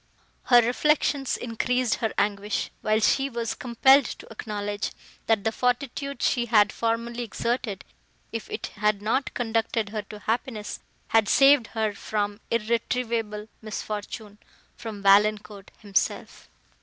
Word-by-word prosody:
Her 240 -1 +6
reflections 275 +2 +1
increased 245 +1 0
her 225 -2 -1
anguish, 205 0 -1
while 215 +1 +2
she 270 +5 +2
was 235 -3 -3
compelled 265 +3 +4
to - - -7
acknowledge, 205 -1 -4 0.4
that 220 -3 +2
the 225 - +1
fortitude 255 +2 -2
she 240 -2 +1
had 210 -3 +4
formerly 230 +1 -2
exerted, 230 -3 -3 0.5
if 230 -1 -5
it 215 - -4 0.2
had 210 -1 +2
not 260 +6 0
conducted 225 -3 0
her 215 0 -3
to 210 +1 -11
happiness, 220 0 -3 0.3
had 225 -2 +3
saved 275 -3 +6
her 215 -1 +1
from 205 0 -3
irretrievable 230 -1 -1
misfortune—from 210 0 -8
Valancourt 205 0 +3
himself! 200 -1 -2
225 Hz, 120 wpm, -26 LUFS, 210-240 Hz, 0.5 s, Her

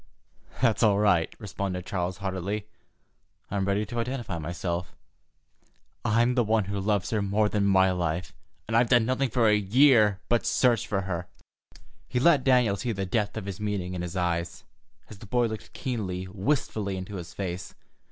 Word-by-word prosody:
"That's 115 -4 +3
all 105 -4 +4
right," 90 -6 +3
responded 95 -4 -4
Charles 90 -1 -2
heartily. 100 +2 -3 0.9
"I'm 100 -1 0
ready 100 +2 0
to 120 +3 -5
identify 115 -7 -3
myself. 85 +2 -4 1.1
I'm 115 +3 +3
one 110 -3 +2
who 100 +1 -3
loves 100 -1 0
her 110 -2 +1
better 105 +2 +1
than 100 -2 +1
my 95 -1 +4
life, 85 -1 -2 0.3
and 110 - -1
I've 120 0 +4
done 120 -3 +5
nothing 130 +2 0
for 115 -1 +2
a 105 - +5
year 105 -1 +4
but 120 -1 +2
search 120 -3 +2
for 100 -2 0
her." 90 -2 -4 0.8
He 125 - -1
let 145 -1 +4
Daniel 125 -6 +3
see 120 +2 -2
the 95 -1 -3
depth 105 +3 -1
of 105 - -5
his 100 -1 -6
meaning 100 -4 -2
in 90 - -4
his 90 +1 -5
eyes, 85 -1 -2 0.4
as 105 - -12
the 110 - -11
boy 120 +3 +2
looked 110 -1 -6
keenly, 95 -8 -3
wistfully, 100 -1 -1
into 95 +2 -6
his 85 -1 -9
face. 90 -2 -5
100 Hz, 170 wpm, -27 LUFS, 95-115 Hz, 1.1 s, done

